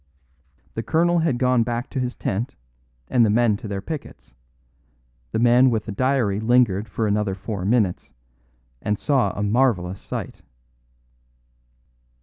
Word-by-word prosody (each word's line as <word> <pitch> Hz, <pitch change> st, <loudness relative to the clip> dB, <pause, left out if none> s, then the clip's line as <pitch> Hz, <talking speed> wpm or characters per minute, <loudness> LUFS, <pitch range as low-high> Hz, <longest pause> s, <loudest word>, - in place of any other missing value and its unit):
The 115 Hz, -, -3 dB
colonel 170 Hz, +6 st, +2 dB
had 160 Hz, -6 st, +1 dB
gone 125 Hz, -1 st, +2 dB
back 120 Hz, +2 st, -2 dB
to 135 Hz, -, -2 dB
his 125 Hz, -1 st, -2 dB
tent, 105 Hz, +6 st, -3 dB, 0.5 s
and 120 Hz, -, +3 dB
the 110 Hz, -, +3 dB
men 115 Hz, 0 st, +3 dB
to 110 Hz, -, -8 dB
their 100 Hz, -1 st, -4 dB
pickets; 150 Hz, -, -8 dB, 1.0 s
the -, -, -1 dB
man 120 Hz, +3 st, +5 dB
with 110 Hz, -3 st, -1 dB
the -, -, -5 dB
diary 120 Hz, -3 st, +1 dB
lingered 110 Hz, -3 st, +2 dB
for 110 Hz, -, -2 dB
another 105 Hz, -2 st, 0 dB
four 100 Hz, -1 st, -5 dB
minutes, 105 Hz, -4 st, 0 dB, 0.7 s
and 105 Hz, 0 st, -1 dB
saw 135 Hz, +1 st, +1 dB
a 105 Hz, -, -1 dB
marvellous 105 Hz, -5 st, +1 dB
sight. -, -, -6 dB
115 Hz, 140 wpm, -23 LUFS, 105-125 Hz, 1.0 s, man